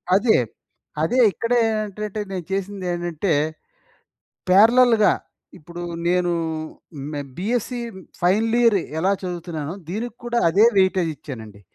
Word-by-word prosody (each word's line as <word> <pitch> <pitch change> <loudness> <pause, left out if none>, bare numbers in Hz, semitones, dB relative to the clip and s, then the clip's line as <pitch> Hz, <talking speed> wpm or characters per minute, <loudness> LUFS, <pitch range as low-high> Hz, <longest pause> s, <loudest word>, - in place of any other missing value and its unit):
అదే. 220 +3 +4 0.6
అదే 165 +11 +1
ఇక్కడే 235 +5 0 0.2
ఏంటంటే 210 0 -3
నేను 185 -3 -4
చేసిందేంటంటే, 180 -3 -2 1.2
పారలెల్‌గా 225 +3 +6 0.5
ఇప్పుడు 170 +3 -9 0.3
నేను 180 0 +2 0.8
మే 145 - -3 0.2
బీఎస్సీ 240 +5 -2 0.4
ఫైనల్ 210 +6 +2
ఇయర్ 230 -3 +5 0.2
ఎలా 185 +4 +2
చదువుతున్నానో 170 -3 -5
దీనికి 220 +6 -4
కూడా 240 0 0
అదే 195 +6 +4
వెయిటేజ్ 185 -3 +2
ఇచ్చానండి. 110 -8 -9
190 Hz, 100 wpm, -22 LUFS, 175-220 Hz, 1.2 s, పారలెల్‌గా